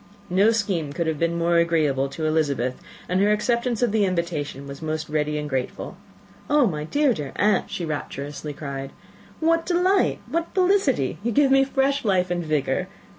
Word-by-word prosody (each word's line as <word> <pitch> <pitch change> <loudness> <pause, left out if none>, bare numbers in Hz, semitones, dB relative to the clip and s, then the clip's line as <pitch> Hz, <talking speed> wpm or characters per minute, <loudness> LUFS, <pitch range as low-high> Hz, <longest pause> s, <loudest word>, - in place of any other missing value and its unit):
No 195 +4 +5
scheme 195 -10 -1
could 170 +2 -1
have 160 -2 -2
been 170 0 0
more 170 0 +2
agreeable 155 -5 +2
to 155 +3 -4
Elizabeth, 145 -5 +1 0.3
and 185 +1 +1
her 205 +1 +4
acceptance 235 +2 0
of 240 - +2
the 215 -1 +2
invitation 170 -7 -2
was 140 +1 -9
most 155 0 -3
ready 150 0 0
and 150 0 -3
grateful. 130 -3 -4 0.5
"My 215 - +2
dear, 285 - +2
dear 145 -8 -6
aunt," 210 -1 +2
she 175 - -4
rapturously 145 -1 -5
cried, 140 -2 -6 0.5
"what 330 +1 +2
delight! 365 +3 +2
what 335 +2 -3
felicity! 365 - +2
You 235 +3 -1
give 280 +3 +3
me 270 0 +6
fresh 275 +1 0
life 185 -4 +1
and 175 -1 -1
vigour. 155 +3 0
170 Hz, 175 wpm, -24 LUFS, 150-240 Hz, 0.5 s, me